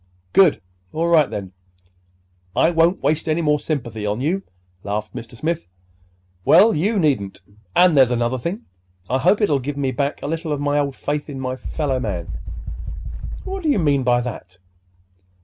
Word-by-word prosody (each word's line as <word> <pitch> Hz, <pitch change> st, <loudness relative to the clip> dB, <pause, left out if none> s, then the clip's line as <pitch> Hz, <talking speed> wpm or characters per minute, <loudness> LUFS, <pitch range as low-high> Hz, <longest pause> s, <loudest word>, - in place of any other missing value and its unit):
"Good! 185 Hz, -6 st, +5 dB, 0.3 s
All 165 Hz, +2 st, 0 dB
right, 160 Hz, -4 st, +5 dB
then. 95 Hz, -3 st, -5 dB, 1.0 s
I 165 Hz, -, +4 dB
won'twaste 165 Hz, -2 st, +2 dB
any 160 Hz, +2 st, +1 dB
more 150 Hz, -1 st, +3 dB
sympathy 120 Hz, -8 st, -3 dB
on 105 Hz, +2 st, -1 dB
you," 165 Hz, +9 st, 0 dB, 0.4 s
laughed 105 Hz, +1 st, -3 dB
Mr. 115 Hz, +1 st, -8 dB
Smith. 165 Hz, +7 st, -2 dB, 0.8 s
"Well, 200 Hz, -, +6 dB
you 200 Hz, +8 st, +1 dB
needn't. 135 Hz, -, 0 dB, 0.3 s
And 180 Hz, -3 st, +6 dB
there's 130 Hz, -3 st, +6 dB
another 120 Hz, +1 st, 0 dB
thing. 185 Hz, -, -4 dB, 0.5 s
I 130 Hz, -, +2 dB
hope 205 Hz, -, +3 dB
it'll 150 Hz, -10 st, +3 dB
give 140 Hz, +2 st, -4 dB
me 135 Hz, -2 st, 0 dB
back 140 Hz, +1 st, -2 dB
a -, -, -2 dB
little 165 Hz, +1 st, -3 dB
of 145 Hz, -, -1 dB
my 145 Hz, 0 st, +1 dB
old 140 Hz, -2 st, -1 dB
faith 145 Hz, +1 st, -3 dB
in 135 Hz, -2 st, -6 dB
my 130 Hz, -1 st, -2 dB
fellow 135 Hz, 0 st, -2 dB
man." 90 Hz, -8 st, -4 dB, 1.1 s
"What 385 Hz, 0 st, -5 dB
do 320 Hz, -, 0 dB
you 285 Hz, -, +3 dB
mean 145 Hz, -6 st, +2 dB
by 125 Hz, -1 st, +3 dB
that?" 95 Hz, -7 st, -7 dB
145 Hz, 165 wpm, -21 LUFS, 125-165 Hz, 1.1 s, Well